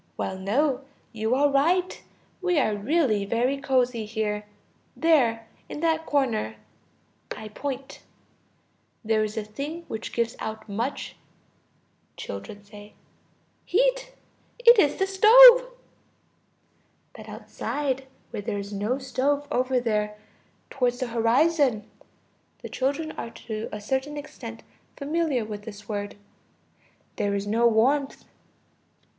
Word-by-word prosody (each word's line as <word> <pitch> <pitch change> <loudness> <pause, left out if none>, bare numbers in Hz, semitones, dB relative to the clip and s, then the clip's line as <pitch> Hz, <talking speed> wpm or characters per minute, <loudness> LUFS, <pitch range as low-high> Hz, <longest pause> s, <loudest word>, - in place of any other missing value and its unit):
Well, 190 - -3
no, 260 +7 0 0.3
you 220 +2 0
are 285 +2 +4
right; 350 +7 +1 0.4
we 360 -2 +1
are 235 -7 +2
really 220 -2 +1
very 235 +6 0
cozy 250 -5 0
here. 210 -1 -3 0.5
There, 245 -9 +3 0.2
in 295 - -6
that 320 -1 0
corner 235 - 0 0.8
(I 215 0 -8
point) 270 +4 -6 1.0
there 220 0 +2
is 215 +1 -4
a 220 - -1
thing 285 +11 -6
which 220 - -5
gives 235 0 -1
out 220 0 -6
much... 230 +7 -4 1.0
Children. 100 - -8 1.0
Heat. - - +1 0.4
It 475 -2 +7
is 290 -6 +4
the 385 - +1
stove. 485 +6 +8 1.5
But - - -11
outside, 270 -2 -4 0.2
where - - -4
there 205 0 -3
is 200 +1 -6
no 210 +6 -1
stove, 280 +2 -1
over 255 0 +1
there, 210 -3 -1 0.5
towards 250 -2 0
the 255 -2 -2
horizon 240 0 +2 0.8
(the - - -6
children 285 +4 -2
are - - -5
to 220 -1 -6
a 210 - -5
certain 265 +7 -2
extent 265 -6 -9 0.3
familiar 295 -4 -1
with 210 -1 -6
this 205 -1 -10
word), 205 -1 -4 1.0
there 200 0 0
is 200 0 -2
no 230 +3 +3
warmth. 265 +5 +1
250 Hz, 120 wpm, -25 LUFS, 215-295 Hz, 1.5 s, stove